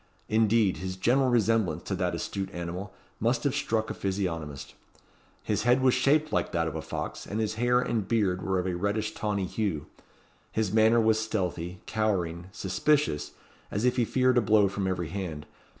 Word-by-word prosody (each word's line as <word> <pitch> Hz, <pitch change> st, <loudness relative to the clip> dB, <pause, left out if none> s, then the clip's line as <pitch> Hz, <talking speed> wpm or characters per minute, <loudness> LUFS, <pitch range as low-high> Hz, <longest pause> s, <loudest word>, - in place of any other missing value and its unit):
Indeed, 110 Hz, -2 st, +3 dB
his 95 Hz, 0 st, -4 dB
general 130 Hz, +7 st, +2 dB
resemblance 115 Hz, -5 st, +2 dB
to -, -, -3 dB
that -, -, 0 dB
astute 95 Hz, -1 st, -3 dB
animal 85 Hz, +3 st, -5 dB, 0.3 s
must 120 Hz, +2 st, +1 dB
have 140 Hz, -3 st, +1 dB
struck 115 Hz, -6 st, -1 dB
a -, -, -2 dB
physiognomist. 80 Hz, -8 st, -3 dB, 0.7 s
His 105 Hz, -3 st, 0 dB
head 120 Hz, +3 st, +4 dB
was 130 Hz, -1 st, +5 dB
shaped 145 Hz, +4 st, +2 dB
like -, -, 0 dB
that 85 Hz, -2 st, +1 dB
of 80 Hz, -, -4 dB
a 80 Hz, -, -3 dB
fox, -, -, -5 dB
and 105 Hz, -, -3 dB
his 110 Hz, -1 st, 0 dB
hair 120 Hz, +2 st, +2 dB
and 115 Hz, -5 st, -1 dB
beard 100 Hz, -6 st, +1 dB
were 95 Hz, -1 st, 0 dB
of 90 Hz, -, -1 dB
a 95 Hz, -, -1 dB
reddish 100 Hz, +4 st, -1 dB
tawny 100 Hz, -3 st, -1 dB
hue. 90 Hz, -6 st, -2 dB, 0.7 s
His 110 Hz, -3 st, -1 dB
manner 110 Hz, +1 st, +5 dB
was 110 Hz, -1 st, +3 dB
stealthy, 90 Hz, -5 st, -3 dB
cowering, 90 Hz, -6 st, -1 dB
suspicious, 145 Hz, -, 0 dB, 0.4 s
as 105 Hz, +4 st, -1 dB
if 125 Hz, -, +2 dB
he 120 Hz, -, +3 dB
feared 130 Hz, +1 st, +3 dB
a -, -, +1 dB
blow 105 Hz, -1 st, +4 dB
from 95 Hz, 0 st, -2 dB
every 90 Hz, -3 st, -2 dB
hand. 80 Hz, -6 st, -5 dB
105 Hz, 180 wpm, -28 LUFS, 95-115 Hz, 0.7 s, was